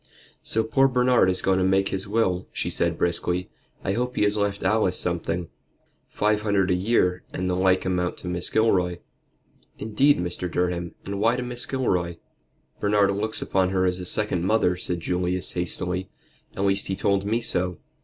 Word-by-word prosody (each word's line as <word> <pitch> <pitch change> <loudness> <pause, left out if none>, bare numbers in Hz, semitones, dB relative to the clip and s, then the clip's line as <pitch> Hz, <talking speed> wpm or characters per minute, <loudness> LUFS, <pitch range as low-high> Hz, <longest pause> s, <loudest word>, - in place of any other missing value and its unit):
"So 110 - 0
poor 135 +5 +3
Bernard 125 -5 +3
is 95 - +1
going 95 0 +2
to - - +2
make 95 +1 +2
his 95 +1 -2
will," 95 -4 0
she - - -3
said - - 0
briskly. 90 +1 0 0.3
"I 95 - 0
hope 125 +3 -2
he - - +2
has 105 0 +2
left 100 -1 -1
Alice 110 -4 +2
something." 85 0 -2 0.6
"Five 105 0 +1
hundred 100 -3 +1
a - - +4
year, 90 -1 +1
and 90 - -3
the 90 - 0
like 95 0 +2
amount 90 -1 -1
to - - -8
Mrs. 90 0 -3
Gilroy." 90 -6 +2 0.8
"Indeed, 130 +7 +3
Mr. 90 +1 -3
Durham; 90 -1 -1
and 100 0 -4
why 115 +3 +3
to 125 - -3
Mrs. 120 0 -5
Gilroy?" 90 -10 0 0.6
"Bernard 100 -1 +2
looks 110 +2 -1
upon 95 -1 +1
her 95 -1 +1
as 90 0 0
a 90 - -6
second 90 -2 -1
mother," 95 -2 +2
said 90 -1 -4
Julius, 90 +1 -1
hastily; 90 +1 -2 0.5
"at 95 - 0
least 100 0 +1
he 95 - -1
told 100 0 +1
me 110 +3 0
so. 90 -6 0
95 Hz, 185 wpm, -24 LUFS, 90-105 Hz, 0.8 s, a